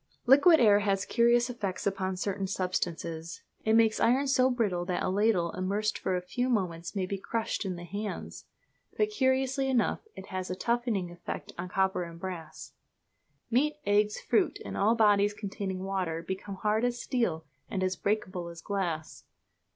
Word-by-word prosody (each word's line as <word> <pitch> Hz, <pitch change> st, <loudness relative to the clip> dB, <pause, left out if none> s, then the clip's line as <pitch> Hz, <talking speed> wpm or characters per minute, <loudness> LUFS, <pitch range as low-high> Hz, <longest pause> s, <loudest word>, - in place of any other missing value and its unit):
Liquid 290 Hz, +6 st, +7 dB
air 210 Hz, -3 st, +6 dB
has 195 Hz, -2 st, 0 dB
curious 240 Hz, 0 st, +3 dB
effects 205 Hz, -7 st, -4 dB
upon 190 Hz, -1 st, -1 dB
certain 195 Hz, 0 st, -2 dB
substances. 170 Hz, -3 st, -3 dB, 0.2 s
It 220 Hz, -, +2 dB
makes 225 Hz, -1 st, +4 dB
iron 260 Hz, +4 st, +3 dB
so 260 Hz, -1 st, +4 dB
brittle 210 Hz, -8 st, 0 dB
that 180 Hz, -1 st, -1 dB
a -, -, 0 dB
ladle 190 Hz, -3 st, +2 dB
immersed 200 Hz, +3 st, -1 dB
for 185 Hz, -, -1 dB
a 180 Hz, -, -2 dB
few 245 Hz, +8 st, -1 dB
moments 180 Hz, -6 st, -1 dB
may 190 Hz, -2 st, 0 dB
be 195 Hz, +1 st, -4 dB
crushed 225 Hz, +1 st, -2 dB
in 185 Hz, -2 st, -2 dB
the 175 Hz, -, -8 dB
hands; 205 Hz, +4 st, -6 dB, 0.5 s
but, 425 Hz, 0 st, +2 dB
curiously 265 Hz, -4 st, +1 dB
enough, 250 Hz, -3 st, +2 dB, 0.2 s
it -, -, -9 dB
has 185 Hz, -1 st, -4 dB
a 185 Hz, -, -2 dB
toughening 235 Hz, -4 st, -1 dB
effect 175 Hz, -, -7 dB
on 175 Hz, +1 st, -5 dB
copper 190 Hz, 0 st, +1 dB
and 170 Hz, -1 st, -7 dB
brass. 175 Hz, -3 st, -7 dB, 0.8 s
Meat, 295 Hz, +6 st, +2 dB
eggs, 210 Hz, +1 st, +2 dB
fruit, 400 Hz, +1 st, +1 dB
and -, -, -5 dB
all 215 Hz, +4 st, +3 dB
bodies 205 Hz, -2 st, +4 dB
containing 195 Hz, -2 st, -4 dB
water 185 Hz, -4 st, -2 dB
become 190 Hz, +3 st, -5 dB
hard 215 Hz, +3 st, 0 dB
as 245 Hz, 0 st, 0 dB
steel 180 Hz, -13 st, -1 dB, 0.2 s
and 190 Hz, -2 st, -2 dB
as 185 Hz, 0 st, 0 dB
breakable 185 Hz, -4 st, -2 dB
as 170 Hz, 0 st, -9 dB
glass. 170 Hz, -5 st, -3 dB
200 Hz, 170 wpm, -29 LUFS, 185-235 Hz, 0.8 s, Liquid